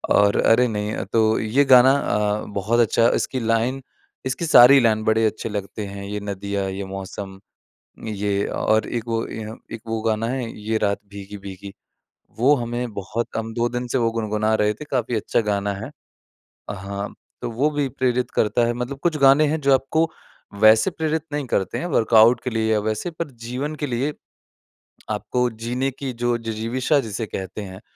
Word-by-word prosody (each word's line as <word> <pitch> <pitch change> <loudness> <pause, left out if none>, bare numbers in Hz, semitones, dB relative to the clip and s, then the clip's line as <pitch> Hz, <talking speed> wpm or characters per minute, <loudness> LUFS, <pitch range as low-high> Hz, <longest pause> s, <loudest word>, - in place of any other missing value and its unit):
और 100 0 +4
अरे 125 +2 +4
नहीं, 105 -1 -3 0.2
तो 110 -1 +3
ये 120 +6 +2
गाना 130 0 +7
अ, 105 -6 0
बहुत 105 +4 +1
अच्छा 115 0 +4
इसकी 130 - -1
लाइन 115 +4 0 0.4
इसकी 130 +6 -2
सारी 135 -3 +8
लाइन 110 -3 +2
बड़े 110 +1 +2
अच्छे 110 +1 -2
लगते 105 0 -5
हैं, 100 0 -7
ये 105 +1 -4
नदियाँ, 100 -1 -3
ये 95 +1 -4
मौसम, 95 0 -7 0.7
ये 100 -1 -1
और 110 0 +1
एक 115 -2 -3
वो 115 -1 -1
य 110 0 -6 0.2
एक 115 - -6
वो 110 0 -2
गाना 110 +1 0
है, 125 -2 -3
ये 110 +1 0
रात 100 -1 0
भीगी-भीगी। 100 -1 -9 0.7
वो 135 +5 +5
हमें 120 -2 -3
बहुत 105 +4 -3
हम 115 0 -4
2 120 +1 +1
दिन 125 0 -3
से 125 - 0
वो 115 -2 +1
गुनगुना 110 -1 0
रहे 105 -1 +2
थे, 150 +8 -10
काफ़ी 125 -2 0
अच्छा 110 +2 0
गाना 100 0 -1
है। 110 +7 -7 0.8
हाँ, 100 +1 -5 0.3
तो - - -3
वो 135 +7 +1
भी 145 -2 -1
प्रेरित 125 0 -1
करता 120 +3 +1
है 120 - +1
मतलब 125 +3 -5
कुछ 170 -3 +1
गाने 140 +2 +6
हैं, 155 +2 -1
जो 140 -1 +4
आपको 160 +5 +1 0.5
वैसे 110 0 +6
प्रेरित 160 0 -1
नहीं 145 -2 -2
करते 95 -6 -1
हैं, 175 - -3
वर्कआउट 115 +1 +5
के 125 - -1
लिए 110 -1 0
या 110 - +3
वैसे 110 +10 -2
पर 165 -2 -5 0.2
जीवन 135 +6 -3
के 150 - -3
लिए, 130 +3 -1 1.0
आपको 125 0 0
जीने 120 +4 -3
की 135 0 -5
जो 120 0 0
जिजीविषा 115 +5 0
जिसे 110 -3 -4
कहते 95 0 -6
हैं, 95 -1 -9
115 Hz, 180 wpm, -22 LUFS, 105-125 Hz, 1.0 s, सारी